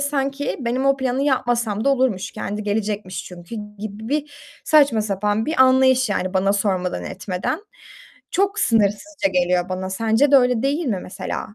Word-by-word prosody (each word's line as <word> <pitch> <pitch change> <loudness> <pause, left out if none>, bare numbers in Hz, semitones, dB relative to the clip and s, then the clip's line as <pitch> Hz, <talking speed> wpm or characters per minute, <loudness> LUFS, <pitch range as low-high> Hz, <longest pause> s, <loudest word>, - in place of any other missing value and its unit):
sanki 280 0 -1
benim 255 +2 -1
o 275 0 +4
planı 260 0 -1
yapmasam 240 -6 0
da 275 - +4
olurmuş, 250 -8 0
kendi 210 +1 -4
gelecekmiş 205 -2 -3
çünkü 175 +4 -10 0.2
gibi 215 +1 -7
bir 290 +1 -2 0.3
saçma 285 -8 +4
sapan 210 +1 -1
bir 310 -4 +4
anlayış 260 -1 +4
yani 185 -1 -2
bana 195 +1 +2
sormadan 190 -3 -1
etmeden. 190 - -3 0.7
Çok 400 +2 +1
sınırsızca 220 - +1
geliyor 180 0 +1
bana. 185 0 -4
Sence 225 +7 +2
de - - +9
öyle 250 -3 +3
değil 290 +5 0
mi 210 -7 0
mesela? 205 +2 -6
225 Hz, 155 wpm, -21 LUFS, 200-270 Hz, 0.7 s, de